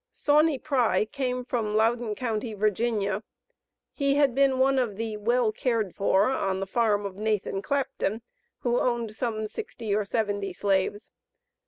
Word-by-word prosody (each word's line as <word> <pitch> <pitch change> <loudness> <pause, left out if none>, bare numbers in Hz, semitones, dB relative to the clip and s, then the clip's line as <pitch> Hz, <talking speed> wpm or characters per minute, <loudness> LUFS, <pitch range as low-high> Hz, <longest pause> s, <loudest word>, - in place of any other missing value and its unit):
Sauney 300 0 +3
Pry 245 -9 +1
came 250 +1 -3
from 220 -4 -1
Loudon 225 0 +1
Co., 230 -3 -1
Va. 215 -1 -1 0.7
He 280 -1 +1
had 285 -3 +3
been 270 0 +3
one 265 +1 +3
of 235 -6 -1
the 220 0 -3
"well 235 +2 +2
cared 220 -5 -1
for," 200 +4 +2
on 195 -7 -1
the 195 - -2
farm 205 0 +1
of 195 -1 -6
Nathan 210 -2 -1
Clapton, 235 -4 -2 0.4
who 240 0 +1
owned 235 -3 -1
some 220 -2 -2
sixty 225 - -5
or 210 +1 +2
seventy 205 -2 -2
slaves. 200 +2 -1
225 Hz, 150 wpm, -27 LUFS, 205-250 Hz, 0.7 s, Sauney